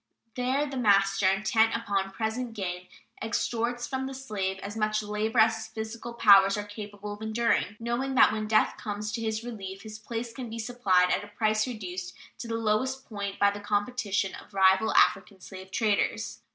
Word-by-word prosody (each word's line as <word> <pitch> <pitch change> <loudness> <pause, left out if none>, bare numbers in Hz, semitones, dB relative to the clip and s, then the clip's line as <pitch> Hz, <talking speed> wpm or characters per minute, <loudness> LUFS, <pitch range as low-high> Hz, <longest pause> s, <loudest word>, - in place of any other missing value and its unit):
There 260 +4 0
the 275 -2 -6
master, 195 -4 +3
intent 215 +3 +2
upon 200 -4 -1
present 225 +3 -3
gain, 180 -3 -4 0.3
extorts 235 +2 -1
from 265 0 -3
the 270 - -6
slave 205 -8 -3
as 205 +2 -6
much 215 -1 0
labor 210 +2 -2
as 225 0 +5
his 220 0 -7
physical 225 +2 -6
powers 200 -3 +6
are 205 - -2
capable 205 0 -8
of 205 - -11
enduring, 220 -2 0
knowing 240 +3 -2
that - - +7
when 215 0 -3
death 215 0 +2
comes 210 0 -4
to 230 +2 -3
his 220 0 -2
relief 195 -5 -7
his 215 -1 -9
place 230 +1 -5
can 245 -1 -7
be 225 - -6
supplied 215 -6 +2
at - - +1
a - - -9
price 215 +2 0
reduced 185 -6 -6 0.2
to 240 - -6
the 230 - -2
lowest 230 +4 0
point 200 -2 -5
by 200 0 +4
the 205 - -7
competition 205 -1 -1
of 205 - -12
rival 190 +3 +4
African 195 -1 +3
slave 190 +1 -10
traders. 210 +1 0
215 Hz, 185 wpm, -28 LUFS, 200-230 Hz, 0.3 s, that